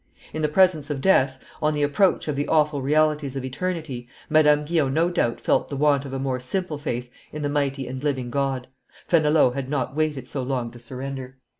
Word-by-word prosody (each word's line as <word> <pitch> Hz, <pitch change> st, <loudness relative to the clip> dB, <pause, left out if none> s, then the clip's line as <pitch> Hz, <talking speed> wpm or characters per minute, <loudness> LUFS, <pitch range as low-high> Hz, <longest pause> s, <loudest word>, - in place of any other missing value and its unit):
In 155 Hz, -, -3 dB
the 150 Hz, -, +2 dB
presence 160 Hz, -3 st, +3 dB
of 145 Hz, -2 st, -2 dB
death, 135 Hz, -6 st, +3 dB, 0.2 s
on 150 Hz, 0 st, +2 dB
the 145 Hz, -, 0 dB
approach 155 Hz, +7 st, +2 dB
of 150 Hz, -, -1 dB
the 145 Hz, +1 st, -1 dB
awful 150 Hz, -2 st, +2 dB
realities 150 Hz, 0 st, +1 dB
of 135 Hz, -1 st, -3 dB
eternity, 145 Hz, -3 st, -4 dB, 0.2 s
Madame 150 Hz, -1 st, +5 dB
Guyon 150 Hz, -4 st, +1 dB
no 170 Hz, +2 st, +2 dB
doubt 120 Hz, -9 st, 0 dB
felt -, -, +1 dB
the 140 Hz, -, -4 dB
want 145 Hz, -1 st, +3 dB
of 135 Hz, -, -7 dB
a -, -, -1 dB
more 130 Hz, -1 st, -2 dB
simple 155 Hz, +4 st, -3 dB
faith 125 Hz, -3 st, -3 dB, 0.2 s
in 150 Hz, 0 st, -5 dB
the 145 Hz, -, 0 dB
mighty 140 Hz, -2 st, -1 dB
and 130 Hz, +2 st, -6 dB
living 130 Hz, -4 st, -1 dB
God. 135 Hz, -2 st, -1 dB, 0.4 s
Fenelon 155 Hz, -5 st, +4 dB
had 135 Hz, 0 st, -4 dB
not 135 Hz, -2 st, -2 dB
waited 150 Hz, -5 st, -1 dB
so 140 Hz, -1 st, -3 dB
long 125 Hz, -2 st, -2 dB
to 120 Hz, -, -13 dB
surrender. 130 Hz, +2 st, -7 dB
145 Hz, 205 wpm, -24 LUFS, 130-155 Hz, 0.4 s, Madame